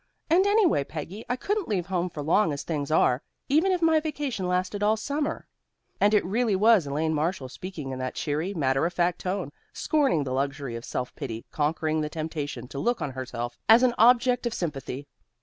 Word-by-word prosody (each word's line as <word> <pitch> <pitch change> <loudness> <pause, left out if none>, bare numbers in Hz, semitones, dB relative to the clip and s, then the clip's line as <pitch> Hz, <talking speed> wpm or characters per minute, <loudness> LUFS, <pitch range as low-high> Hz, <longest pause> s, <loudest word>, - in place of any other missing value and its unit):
And, 370 +4 +5
anyway, 405 - +3
Peggy, 165 +9 -7
I 250 - +1
couldn't 405 +9 -2
leave 190 -6 -1
home 180 -1 -1
for 150 -3 -6
long 165 +3 +3
as 140 0 -4
things 145 -4 -3
are, 135 -4 +3 0.3
even 320 +7 +3
if 360 -2 0
my 320 -1 +5
vacation 290 - -3
lasted 185 +3 -1
all 215 +1 +3
summer." 290 +7 -2 0.5
And 210 +1 +4
it 205 - +3
really 215 +2 +1
was 210 -5 +4
Elaine 155 +3 0
Marshall, 150 -3 -1
speaking 155 -2 -7
in 130 - -5
that 130 0 -3
cheery, 155 +5 -2
matter 135 0 +1
of 175 - -6
fact 175 0 +1
tone, 185 -4 -3 0.2
scorning 275 - +1
the 130 -2 -3
luxury 135 -2 -2
of 115 - -7
self 125 0 -4
pity, 115 -6 -6
conquering 155 +1 0
the 150 - -2
temptation 150 -5 -5
to 140 - -6
look 240 +6 0
on 140 - -3
herself 120 -2 -5
as 230 +3 +8
an 250 -1 +4
object 245 +1 +4
of 235 - -3
sympathy. 140 -4 -4
175 Hz, 200 wpm, -26 LUFS, 145-235 Hz, 0.5 s, as